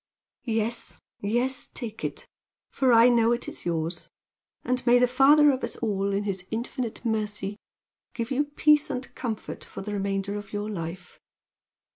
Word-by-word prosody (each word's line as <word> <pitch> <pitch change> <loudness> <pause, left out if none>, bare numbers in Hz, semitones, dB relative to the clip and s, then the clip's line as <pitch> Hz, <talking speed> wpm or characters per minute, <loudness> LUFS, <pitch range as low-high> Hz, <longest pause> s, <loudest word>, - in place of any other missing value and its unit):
"Yes! 225 +1 -1 0.2
yes! 245 +6 0
Take 225 -3 -6
it, - - -4 0.4
for 260 -2 +2
I 230 0 +8
know 235 -1 +4
it 240 - -3
is - - -6
yours! 165 +1 -2 0.5
And 250 0 -1
may 240 +1 +7
the 250 - +5
Father 285 +4 +6
of 260 -1 -3
us - - -3
all, 200 -3 -1
in 200 +1 0
His 195 -3 -3
infinite 235 +1 -4
mercy, 210 -2 -2 0.6
give 235 0 -3
you 280 +3 +2
peace 300 +1 +3
and 260 -1 -4
comfort 225 -4 -5
for - - -8
the 210 +1 -5
remainder 195 0 -1
of 205 0 -9
your 205 +1 -3
life! 175 -1 -6
225 Hz, 160 wpm, -27 LUFS, 200-250 Hz, 0.6 s, I